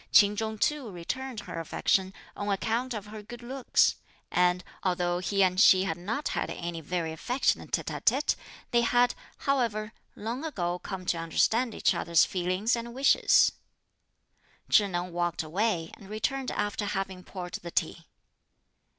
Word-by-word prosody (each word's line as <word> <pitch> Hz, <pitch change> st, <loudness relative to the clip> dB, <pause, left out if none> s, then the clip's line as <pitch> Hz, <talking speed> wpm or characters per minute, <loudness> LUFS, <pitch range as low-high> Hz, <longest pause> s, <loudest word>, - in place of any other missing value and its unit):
Ch'in 205 Hz, -1 st, +6 dB
Chung 220 Hz, 0 st, -2 dB
too 285 Hz, +1 st, 0 dB
returned 220 Hz, +7 st, -5 dB
her 165 Hz, -, -6 dB
affection, 185 Hz, +3 st, +1 dB, 0.2 s
on 205 Hz, 0 st, -3 dB
account 230 Hz, +5 st, -1 dB
of 210 Hz, -2 st, -5 dB
her 210 Hz, 0 st, -8 dB
good 240 Hz, +3 st, -10 dB
looks; 260 Hz, +1 st, +2 dB, 0.3 s
and, 180 Hz, 0 st, +3 dB, 0.2 s
although 175 Hz, -1 st, 0 dB
he 195 Hz, +2 st, +2 dB
and 185 Hz, 0 st, +3 dB
she 185 Hz, -2 st, +7 dB
had 165 Hz, -4 st, -1 dB
not 215 Hz, -, -3 dB
had -, -, -2 dB
any 170 Hz, -1 st, -5 dB
very 165 Hz, 0 st, -2 dB
affectionate 245 Hz, -, 0 dB
tête -, -, -2 dB
à -, -, -5 dB
têtes, -, -, +3 dB, 0.4 s
they 240 Hz, -1 st, +4 dB
had, 245 Hz, +1 st, +3 dB, 0.3 s
however, 225 Hz, -6 st, 0 dB, 0.2 s
long 235 Hz, +6 st, -4 dB
ago 180 Hz, -, -2 dB
come 190 Hz, -1 st, -6 dB
to 170 Hz, -, 0 dB
understand 225 Hz, +8 st, +1 dB
each -, -, +2 dB
other's 170 Hz, -1 st, +3 dB
feelings 185 Hz, +5 st, 0 dB
and 235 Hz, 0 st, -6 dB
wishes. 270 Hz, +2 st, +5 dB, 1.2 s
Chih 205 Hz, -, +6 dB
Neng 175 Hz, -1 st, -3 dB
walked 175 Hz, -1 st, -1 dB
away 170 Hz, 0 st, -1 dB
and 195 Hz, -3 st, -14 dB
returned 255 Hz, +5 st, -2 dB
after 205 Hz, 0 st, -2 dB
having 195 Hz, -2 st, -3 dB
poured 180 Hz, -2 st, -7 dB
the 170 Hz, -, -6 dB
tea. 165 Hz, 0 st, -2 dB
200 Hz, 160 wpm, -28 LUFS, 175-230 Hz, 1.2 s, she